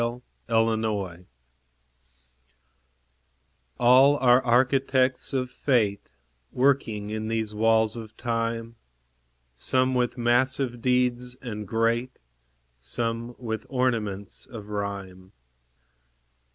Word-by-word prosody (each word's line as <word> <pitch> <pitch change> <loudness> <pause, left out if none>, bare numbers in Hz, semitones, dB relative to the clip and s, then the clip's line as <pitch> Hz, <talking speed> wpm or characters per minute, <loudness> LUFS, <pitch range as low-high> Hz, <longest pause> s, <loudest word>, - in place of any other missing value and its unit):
THE 120 +1 -2 0.4
BUILDERS 110 -6 0 2.5
All 130 +4 +6
are 125 -1 +4
architects 130 +1 +2
of 130 -2 -2
Fate, 110 -9 0 0.4
Working 120 -6 +1
in 110 0 -3
these 110 -1 -2
walls 110 0 +2
of 110 -2 -9
Time; 115 -1 -3 0.8
Some 130 - +1
with 125 -1 0
massive 120 +1 +1
deeds 125 0 +1
and 105 -5 -6
great, 115 +4 0 0.6
Some 115 - -3
with 110 -3 -5
ornaments 110 -7 -2
of 105 -4 -10
rhyme. 100 -3 -5
115 Hz, 85 wpm, -26 LUFS, 110-125 Hz, 2.5 s, All